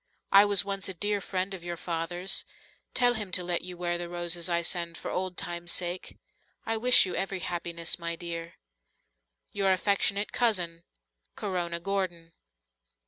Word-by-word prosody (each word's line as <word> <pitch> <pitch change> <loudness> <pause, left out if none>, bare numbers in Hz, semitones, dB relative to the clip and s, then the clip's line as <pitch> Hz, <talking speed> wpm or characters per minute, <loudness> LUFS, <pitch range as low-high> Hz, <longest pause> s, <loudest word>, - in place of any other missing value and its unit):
I 200 +1 +9
was 200 -1 +3
once 195 -1 -1
a 190 - -4
dear 205 +3 0
friend 190 +1 -2
of 185 -3 -7
your 175 0 -4
father's. 175 +2 -1 0.5
Tell 245 -1 +5
him 210 -5 -3
to 180 - +3
let 175 -1 0
you 180 0 -7
wear 175 0 -1
the 175 0 -5
roses 175 0 -1
I 170 0 +1
send 170 -1 -2
for - - -5
old 185 -1 -2
times' 175 0 -2
sake. 180 0 -2 0.5
I 225 - 0
wish 250 +1 +7
you 185 - -4
every 195 -1 -2
happiness, 170 0 -2
my 170 0 -2
dear. 170 0 -6 1.0
"Your 195 -1 +2
affectionate 200 +1 +2
cousin, 180 -8 +1 0.5
"Corona 175 -4 -2
Gordon." 175 -3 -2
180 Hz, 160 wpm, -29 LUFS, 170-195 Hz, 1.0 s, I